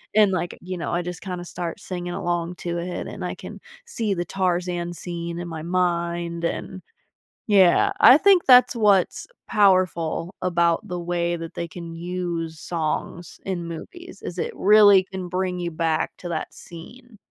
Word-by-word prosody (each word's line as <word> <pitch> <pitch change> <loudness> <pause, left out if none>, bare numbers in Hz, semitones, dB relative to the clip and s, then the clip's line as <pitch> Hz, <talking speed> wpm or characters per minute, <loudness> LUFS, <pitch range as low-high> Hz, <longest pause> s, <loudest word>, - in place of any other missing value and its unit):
and, 210 -2 +5
like, 175 -1 -3
you 185 +1 -5
know, 170 - -4
I 175 +1 0
just 180 -1 -6
kinda 180 -2 -5
start 175 +2 -5
singing 175 -3 -5
along 175 0 -2
to 170 0 -4
it 175 +1 -4
and - - -7
I - - -3
can - - -10 0.3
see 225 - -2
the 175 -2 -2
Tarzan 175 -1 -1
scene 170 -1 -5
in 175 - -5
my 160 -2 -6
mind 170 -1 -1
and 185 +2 -3 0.7
yeah. 205 - +5
I 265 - +9
think 385 0 +5
that's 250 -1 +7
what's 205 -4 +2 0.2
powerful 185 -4 +2
about 170 +2 +1
the 180 -1 -3
way 175 0 -1
that 165 -1 -8
they 170 - -4
can 170 0 -8
use 170 -2 -4
songs 165 +1 -4
in 175 -3 -3
movies, 345 - -9
is - - -6
it 470 - -1
really 205 -2 +6
can 190 -1 -7
bring 185 0 -2
you 170 -1 -2
back 160 -1 -1
to 175 - -7
that 160 -2 -4
scene. 235 +8 -13
175 Hz, 170 wpm, -23 LUFS, 170-190 Hz, 0.7 s, I